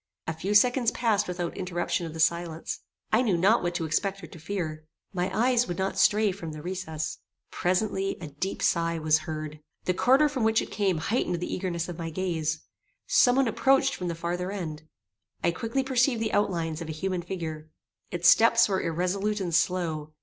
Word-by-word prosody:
A 160 - -2
few 190 +6 -2
seconds 245 +2 +5
passed 225 -4 +1
without 175 -1 -3
interruption 175 -1 -2
of 160 - -8
the - - -7
silence. 165 0 0 0.3
I 220 - +4
knew 210 -8 +2
not 195 +7 +4
what 175 0 -2
to 170 -2 -1
expect 195 +5 -1
or - - -5
to 170 - -12
fear. 160 -3 -4 0.3
My 180 0 -1
eyes 245 +2 +2
would 175 - -4
not 190 0 -1
stray 210 +2 +4
from 165 -4 -7
the 155 - -7
recess. 165 -4 -4 0.3
Presently, 190 +1 0
a 175 - -6
deep 165 +7 -4
sigh 165 -1 +1
was 155 0 +3
heard. 155 -1 -5 0.3
The 180 - +2
quarter 265 +10 +4
from 265 -5 -2
which 220 0 +3
it - - -5
came 195 -5 +1
heightened 180 0 -1
the 180 - -4
eagerness 175 -3 -2
of 175 -2 -7
my 165 -1 -3
gaze. 160 -3 -2 0.4
Some 245 0 +4
one 270 -1 +3
approached 270 +4 +3
from 180 - -4
the 170 - -2
farther 175 +2 -3
end. 160 -6 -5 0.6
I 170 - +3
quickly 230 +9 -2
perceived 255 -2 +2
the 220 -1 -2
outlines 170 -5 0
of 165 - -6
a - - -3
human 185 +3 -2
figure. 160 -4 -6 0.4
Its 175 -1 +1
steps 230 +5 +6
were 190 -2 0
irresolute 190 +5 -1
and 175 -3 -3
slow. 160 -3 0
180 Hz, 195 wpm, -27 LUFS, 165-210 Hz, 0.6 s, steps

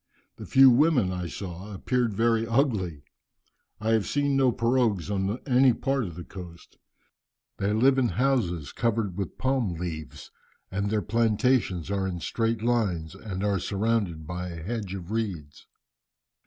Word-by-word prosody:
The - - -9
few 135 -1 +7
women 125 - +3
I 90 -1 -3
saw 95 +3 -7
appeared 120 +1 0
very 115 +1 +2
ugly. 110 - 0 0.8
I 110 +1 -2
have 110 -2 +2
seen 145 -1 +1
no 135 -2 +4
pirogues 115 -6 +1
on 100 +2 -1
any 130 -1 +5
part 135 0 -1
of 85 -4 -7
the 90 - -7
coast. 85 -3 -11 0.8
They 100 +1 0
live 130 +5 +4
in 125 - +3
houses 110 - 0
covered 115 -5 -1
with 100 -2 -4
palm 130 -8 0
leaves, 80 -5 -6 0.4
and 100 +1 -1
their 105 -1 0
plantations 110 - +1
are 100 -1 0
in 90 -2 -4
straight 115 +5 -1
lines 100 -10 0
and 100 -3 -6
are 100 -2 +1
surrounded 100 -5 -1
by 90 +3 -5
a 85 -2 -7
hedge 100 -1 -4
of 90 0 -8
reeds." 95 -10 -4
105 Hz, 155 wpm, -27 LUFS, 90-120 Hz, 0.8 s, few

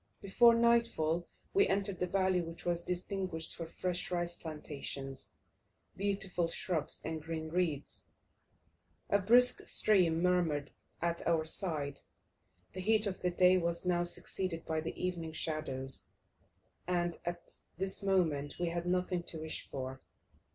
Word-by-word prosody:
Before 230 +4 +6
nightfall 230 -9 +2 0.3
we 400 +1 +5
entered 195 -2 -1
a 180 - +2
valley 185 -1 +2
which 165 0 -8
was 175 -1 +1
distinguished 180 -2 -3
for 165 - -5
fresh 180 +1 -2
rice 175 -1 0
plantations, 140 -4 -6 0.6
beautiful 195 -3 0
shrubs, 165 -1 -2
and 160 -1 -3
green 160 0 -4
reeds: 160 -4 -1 1.0
a 200 - +5
brisk 245 +5 +5
stream 180 -6 +4
murmured 170 -5 +2 0.3
at 170 0 -1
our 165 -2 +3
side, 150 -5 -1 0.7
the 185 - -6
heat 215 +3 +3
of 195 -2 -3
the 180 - +2
day 180 +1 +5
was 170 +1 -2
now 175 -1 +2
succeeded 175 -1 -2
by 160 -1 -1
the 165 - -5
evening 170 -3 -2
shadows, 135 -5 -2 0.8
and, 175 -1 0
at 175 0 -6 0.2
this 190 +1 -1
moment 165 -8 +1
we 175 -1 +1
had 170 +1 -3
nothing 180 0 +1
to 170 - -4
wish 160 0 -3
for. 130 -1 -5
175 Hz, 135 wpm, -34 LUFS, 160-185 Hz, 1.0 s, Before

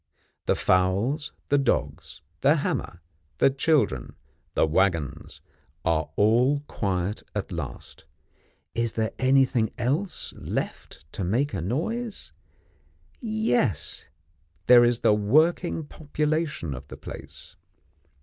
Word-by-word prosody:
The - - +3
fowls, 100 - +1 0.2
the 145 - +4
dogs, 135 - -2 0.2
the - - +4
hammer, - - -2 0.4
the 135 - +4
children, 135 - +1 0.4
the - - +4
waggons, 85 -3 0 0.4
are 80 -2 +1 0.6
quiet 95 -4 -2
at 105 - -3
last. 80 -8 -7 0.7
Is 115 -1 -1
there 110 -1 -1
anything 130 -3 +3
else 150 +10 -2
left - - -5
to 100 - -4
make 120 +10 0
a 95 - -2
noise? 175 - -3 0.9
Yes: 140 - 0 0.6
there 120 -1 +8
is 120 0 +2
the - - +5
working 155 - +2
population 150 - -2
of 65 - -9
the - - -10
place. - - -10
120 Hz, 105 wpm, -26 LUFS, 95-150 Hz, 0.9 s, there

